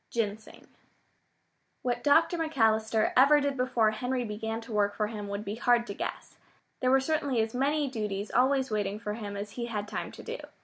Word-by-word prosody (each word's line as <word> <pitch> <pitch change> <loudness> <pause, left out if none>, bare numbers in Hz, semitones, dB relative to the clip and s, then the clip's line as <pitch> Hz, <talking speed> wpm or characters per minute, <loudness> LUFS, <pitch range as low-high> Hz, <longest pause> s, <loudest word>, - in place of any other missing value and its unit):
GINSENG 215 -2 -4 1.2
What 245 -1 -1
Dr. 325 +4 +4
McAllister 225 -9 +1
ever 280 +4 +7
did 285 -1 -1
before 250 -4 +2
Henry 250 +3 -2
began 220 +1 -4
to 230 +1 -11
work 205 -1 +1
for 215 - 0
him 210 -1 -5
would 200 +1 -4
be 200 - -3
hard 240 +1 +2
to 200 - -5
guess. - - -6 0.4
There 255 - +1
were 265 +1 +5
certainly 280 -3 0
as 220 0 0
many 285 +3 +1
duties 210 -5 -3
always 265 0 +2
waiting 205 -1 -1
for 210 -2 -4
him 205 -2 -6
as 205 +1 -5
he 235 +1 -4
had 210 -3 -3
time - - -4
to - - -10
do. 470 +2 -5
230 Hz, 190 wpm, -29 LUFS, 210-265 Hz, 1.2 s, ever